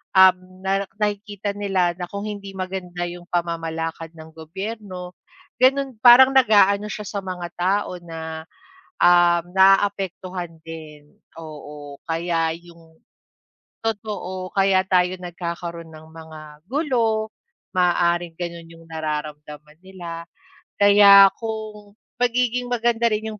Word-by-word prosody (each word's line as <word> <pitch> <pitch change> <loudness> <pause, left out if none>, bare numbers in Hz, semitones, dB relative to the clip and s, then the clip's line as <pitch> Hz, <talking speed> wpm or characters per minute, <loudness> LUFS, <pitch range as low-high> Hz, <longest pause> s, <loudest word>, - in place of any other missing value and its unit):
um, 190 -1 +7 0.3
na 195 +1 0 0.2
nakikita 205 -1 -2
nila 190 -4 0
na 180 - -4
kung 200 +1 -5
hindi 200 -2 -7
maganda 185 -2 -4
yung 175 0 -9
pamamalakad 165 -1 -3
ng 160 0 -11
gobyerno, 185 +2 -7 0.5
ganun 270 0 +3
parang 255 +2 +9
nag-aano 210 -4 +4
siya 210 - -6
sa 200 - -4
mga 180 -2 -5
tao 185 +2 0
na, 160 -1 -7 0.6
um, 175 -1 +5
naaapektuhan 190 -3 +1
din, 155 -2 -10 0.3
oo, 150 -2 -10
kaya 165 0 0
yung 165 -1 -19 0.9
totoo 205 -4 -4
kaya 195 -1 +4
tayo 180 -1 +2
nagkakaroon 170 -1 -6
ng 155 0 -13
mga 160 -1 -11 0.3
gulo, 235 -7 0 0.5
maaaring 175 -1 +2
gano'n 170 -1 -6
yung 165 0 -16
nararamdaman 150 -1 -6
nila, 170 -3 -8 0.5
kaya 200 -1 +8
kung 215 -2 -7 0.2
pagiging 245 0 0
maganda 235 -1 +1
rin 215 +1 -2
yung 210 - -12
180 Hz, 115 wpm, -22 LUFS, 165-205 Hz, 0.9 s, parang